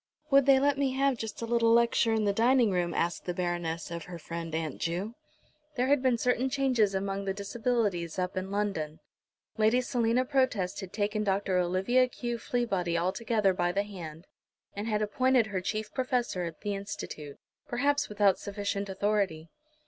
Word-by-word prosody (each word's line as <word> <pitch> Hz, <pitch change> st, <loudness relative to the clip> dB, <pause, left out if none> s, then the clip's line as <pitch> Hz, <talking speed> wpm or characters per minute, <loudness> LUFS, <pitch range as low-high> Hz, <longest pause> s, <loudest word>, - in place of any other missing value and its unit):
"Would 275 Hz, -1 st, +5 dB
they 270 Hz, -1 st, +7 dB
let 280 Hz, 0 st, +2 dB
me 270 Hz, -2 st, +1 dB
have 275 Hz, 0 st, +2 dB
just 225 Hz, 0 st, -6 dB
a -, -, 0 dB
little 230 Hz, 0 st, +3 dB
lecture 235 Hz, 0 st, +4 dB
in 220 Hz, -1 st, +1 dB
the 200 Hz, -, +2 dB
dining 235 Hz, +1 st, +4 dB
room?" 175 Hz, -2 st, 0 dB
asked 170 Hz, +1 st, -1 dB
the 180 Hz, -, -3 dB
Baroness 175 Hz, -2 st, -2 dB
of 170 Hz, -1 st, -5 dB
her 180 Hz, -1 st, -8 dB
friend, 165 Hz, 0 st, -5 dB
Aunt 160 Hz, -3 st, -3 dB
Ju. 180 Hz, +7 st, -2 dB, 0.6 s
There 255 Hz, +1 st, +1 dB
had 285 Hz, -2 st, +4 dB
been 255 Hz, -2 st, +2 dB
certain 250 Hz, +2 st, +1 dB
changes 255 Hz, -7 st, +2 dB
among 195 Hz, +1 st, -2 dB
the 195 Hz, -1 st, -2 dB
Disabilities 200 Hz, -5 st, -1 dB
up 180 Hz, 0 st, -2 dB
in 185 Hz, +1 st, -3 dB
London. 195 Hz, -7 st, -2 dB, 0.6 s
Lady 220 Hz, +3 st, +4 dB
Selina 245 Hz, 0 st, +1 dB
Protest 255 Hz, -9 st, 0 dB
had 190 Hz, -3 st, -7 dB
taken 210 Hz, 0 st, -1 dB
Dr. 195 Hz, -2 st, +1 dB
Olivia 190 Hz, +9 st, +2 dB
Q. 240 Hz, -1 st, -4 dB
Fleabody 195 Hz, -10 st, -1 dB
altogether 195 Hz, +3 st, +1 dB
by 175 Hz, -1 st, 0 dB
the 200 Hz, +3 st, 0 dB
hand, 170 Hz, -5 st, -9 dB, 0.5 s
and 205 Hz, +2 st, -4 dB
had 215 Hz, -1 st, 0 dB
appointed 255 Hz, +3 st, +3 dB
her 195 Hz, -3 st, -3 dB
chief 215 Hz, +3 st, -3 dB
professor 245 Hz, -8 st, -1 dB
at 165 Hz, -2 st, -7 dB
the 205 Hz, -, -2 dB
Institute, 155 Hz, -7 st, -6 dB, 0.3 s
perhaps 285 Hz, +4 st, +1 dB
without 205 Hz, -2 st, +3 dB
sufficient 200 Hz, 0 st, -3 dB
authority. 190 Hz, -5 st, -1 dB
205 Hz, 175 wpm, -29 LUFS, 180-240 Hz, 0.6 s, they